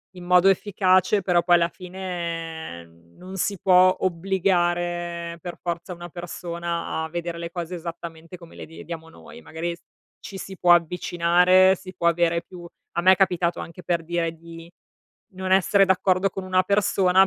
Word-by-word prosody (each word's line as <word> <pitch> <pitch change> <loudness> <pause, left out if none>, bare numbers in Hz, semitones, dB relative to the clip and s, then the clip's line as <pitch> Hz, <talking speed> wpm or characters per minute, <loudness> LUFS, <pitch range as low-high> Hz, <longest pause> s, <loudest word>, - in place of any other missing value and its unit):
In 180 -1 -10
modo 180 +1 +5
efficace, 190 0 +2
però 180 -2 +2
poi 175 0 +4
alla 170 0 +2
fine, 170 - -6
ehm, 85 0 -21
non 185 +1 -10
si 200 +2 -1
può 185 0 +5
obbligare 175 -2 -1
per 175 0 -7
forza 170 +1 -4
una 175 0 -9
persona 170 -1 -4
a - - -5
vedere 170 0 -4
le 170 0 -5
cose 175 0 -5
esattamente 170 0 -8
come 170 -1 -15
le - - -8
vediamo 165 0 -9
noi. 200 +8 -14
Magari 170 -1 -5 0.5
ci 195 - -9
si 190 0 -8
può 175 0 +5
avvicinare, 180 +2 +3
si 185 +1 -11
può 170 - 0
avere 170 0 +1
più 175 0 -11 0.3
a 170 - +1
me 185 +2 +7
è - - +2
capitato, 180 -2 +1
anche 170 +2 -10
per 170 -1 -1
dire, 165 0 -2
di 165 0 -12 0.6
non 185 0 -5
essere 195 +1 +4
d'accordo 190 0 +2
con 190 +1 -6
una 185 0 +2
persona, 190 -1 +3
175 Hz, 165 wpm, -24 LUFS, 170-185 Hz, 0.6 s, me